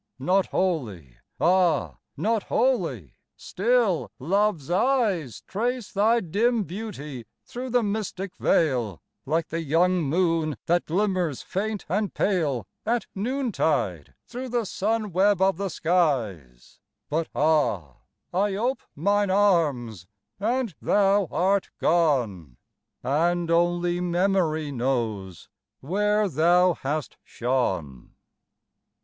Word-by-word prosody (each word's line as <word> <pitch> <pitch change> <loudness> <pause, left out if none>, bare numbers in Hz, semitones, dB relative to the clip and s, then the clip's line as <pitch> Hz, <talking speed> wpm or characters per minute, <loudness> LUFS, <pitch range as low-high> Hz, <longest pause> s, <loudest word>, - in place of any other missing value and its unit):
Not 185 +9 +1
wholly 105 - -2 0.2
ah! 175 -4 +2 0.2
not 225 0 +1
wholly 170 - 0 0.2
still 220 -3 +1
Love's 175 0 0
eyes 195 - +1
Trace 240 +2 -2
thy 225 +4 +3
dim 220 +6 +1
beauty 155 - -7 0.2
through 255 +2 -6
the 245 -1 +2
mystic 200 -2 -3
veil, 125 - +1 0.3
Like 160 +2 0
the 165 +1 -2
young 175 +4 +2
moon 160 -1 0
that 175 +1 +1
glimmers 180 -5 0
faint 210 +2 -3
and 200 +4 -1
pale, 150 - 0 0.2
At 235 +2 0
noontide 195 - -1
through 250 +1 -6
the 240 -2 0
sun 210 +2 -1
web 195 +2 +3
of 190 -2 +2
the 200 0 -2
skies; 120 - -1 0.3
But 160 +2 -1
ah! 145 - +1 0.4
I 195 +2 +1
ope 245 +6 -1
mine 200 +6 +1
arms, 150 - +1 0.3
and 235 0 -1
thou 200 -1 +3
art 195 +2 +1
gone, 120 - +1 0.5
And 170 +5 +1
only 175 +1 +1
Memory 175 -4 +1
knows 115 - -2 0.3
where 210 +7 +1
thou 175 +3 +4
hast 150 -1 -4
shone. 95 - -2
175 Hz, 105 wpm, -25 LUFS, 140-205 Hz, 0.5 s, thou